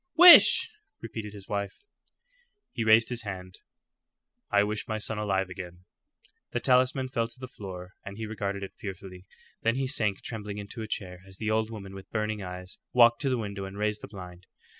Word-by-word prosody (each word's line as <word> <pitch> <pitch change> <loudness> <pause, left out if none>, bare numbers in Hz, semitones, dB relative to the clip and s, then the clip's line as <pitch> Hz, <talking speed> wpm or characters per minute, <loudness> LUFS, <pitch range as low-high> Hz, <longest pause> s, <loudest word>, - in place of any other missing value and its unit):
"Wish!" 355 +5 +9 0.3
repeated 110 -2 -7
his 100 -1 -11
wife. 100 - -4 0.9
He 115 - -3
raised 110 +1 +5
his 120 -2 -2
hand. 95 -3 -8 0.9
"I 100 0 +4
wish 105 +1 -3
my 110 - -2
son 110 0 -3
alive 95 -3 0
again." 90 -1 -9 0.7
The 120 - 0
talisman 130 +1 +2
fell 115 -2 -1
to 125 - -14
the 130 - -7
floor, 95 -5 -9
and 100 0 -8
he 110 - -4
regarded 100 -2 -4
it 95 - -7
fearfully. 95 -3 -9 0.3
Then 115 +1 +1
he 135 0 -1
sank 110 -7 0
trembling 105 -2 -6
into 105 +3 -7
a 110 - -5
chair 90 -4 -5
as 95 -1 -11
the 110 +1 -2
old 110 0 +1
woman, 100 -4 -8
with 95 0 -11
burning 105 -1 -2
eyes, 90 0 -8
walked 120 -1 +6
to 135 - +1
the 130 - +1
window 100 -3 -5
and 95 +1 -9
raised 105 0 -1
the - - -8
blind. 90 -3 -11
105 Hz, 190 wpm, -28 LUFS, 95-115 Hz, 0.9 s, Wish